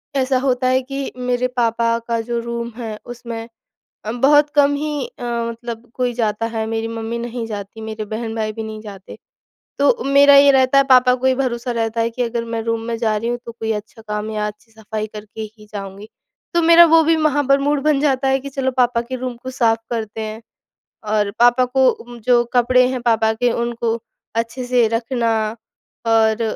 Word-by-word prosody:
ऐसा 265 -1 +2
होता 255 -1 0
है 255 +1 +3
कि 275 +1 -5
मेरे 250 0 0
पापा 230 0 +1
का 230 -1 0
जो 235 +1 -3
रूम 235 0 -4
है, 225 -3 -5
उसमें 235 -1 -7 0.7
बहुत 290 +2 +5
कम 285 -1 +4
ही 295 -2 -3
अ, - - -11
मतलब 235 0 -4
कोई 250 -1 -1
जाता 225 -1 -1
है। 220 - 0
मेरी 225 0 -2
मम्मी 230 +1 -4
नहीं 235 0 -4
जाती, 205 0 -7
मेरे 220 0 -5
बहन-भाई 220 0 -3
भी 225 - -6
नहीं 220 -1 -7
जाते। 200 -3 -10 0.6
तो 480 -1 +2
मेरा 280 +1 +6
ये 280 0 +8
रहता 265 0 +4
है, 275 - +5
पापा 250 0 +6
को 255 +1 -2
ये 260 - +4
भरोसा 250 -2 -2
रहता 225 0 -1
है 230 0 +1
कि 245 +2 -3
अगर 235 -1 -2
मैं 230 -1 -3
रूम 230 0 -1
में 230 - -1
जा 220 -2 +1
रही 225 +3 -2
हूँ, 240 0 -1
तो 235 - -6
कोई 225 -1 -3
अच्छा 215 +1 -7
काम 210 +1 -3
या 210 -1 -2
अच्छी 210 +2 -10
सफ़ाई 220 -1 -5
करके 215 +1 -9 0.2
ही 210 - -15
जाऊँगी। 200 0 -7 0.5
तो 340 - +3
मेरा 335 +1 +8
वो 330 0 +7
भी 325 +1 +3
वहाँ 295 -2 +1
पर 275 0 +5
मूड 290 +1 +1
बन 300 -2 +2
जाता 270 -2 +1
है 265 0 +2
कि, 280 - -7
"चलो, 270 -1 -1
पापा 245 -2 +1
के 255 +2 -5
रूम 250 -1 -5
को 260 - -5
साफ 230 -3 +2
करते 220 -2 -4
हैं।" 220 +1 -6 0.7
और 210 -1 +1
पापा 245 +1 +5
को 245 -2 +1
जो 240 0 +4
कपड़े 250 +1 +4
हैं 255 -1 -3
पापा 225 -2 +2
के, 240 +2 +1
उनको 235 -1 -1 0.4
अच्छे 230 +3 -2
से 245 -2 +3
रखना 230 +1 -1 0.8
और 225 0 +3
235 Hz, 200 wpm, -19 LUFS, 225-255 Hz, 0.8 s, ये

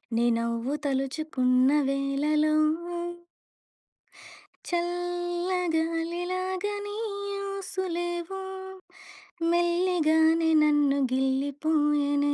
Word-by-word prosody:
నీ 235 - +2
నవ్వు 235 +3 -2
తలుచుకున్న 265 -2 +1 0.2
వేళ‌లో. 295 +3 +1 2.1
చల్లగాలి 350 -1 -1
లాగా 370 +2 -2
నీ 410 0 -6 0.6
ఊసులే‌వో, 360 -1 -4 1.1
మెల్లిగానే 335 -2 +3
నన్ను 295 -2 +3
గిల్లిపో‌యెనే. 285 +2 +1
320 Hz, 55 wpm, -27 LUFS, 285-350 Hz, 2.1 s, మెల్లిగానే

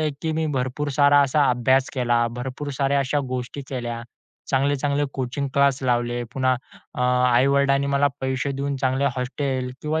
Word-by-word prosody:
आहे, 155 -1 +1
की 160 -1 -1
मी 160 0 -1
भरपूर 135 +1 -2
सारा 145 0 +6
असा 140 +2 +2
अभ्यास 130 +2 +2
केला, 120 -2 +2
भरपूर 130 +3 -5
साऱ्या 140 0 +2
अशा 140 +2 0
गोष्टी 125 +2 -4
केल्या. 120 -3 -4 0.5
चांगले-चांगले 140 +1 +1
कोचिंग 135 +2 -3
क्लास 140 -1 +3
लावले. 120 -1 0
पुन्हा 130 -1 +2 0.4
अ, - - -5 0.3
आई-वडिलांनी 140 +2 +3
मला 140 0 +2
पैसे 130 +1 -1
देऊन 140 0 -2
चांगले 130 +2 +1
हॉस्टेल, 130 0 -2
किंवा 155 +1 -1
135 Hz, 155 wpm, -23 LUFS, 125-140 Hz, 0.5 s, सारा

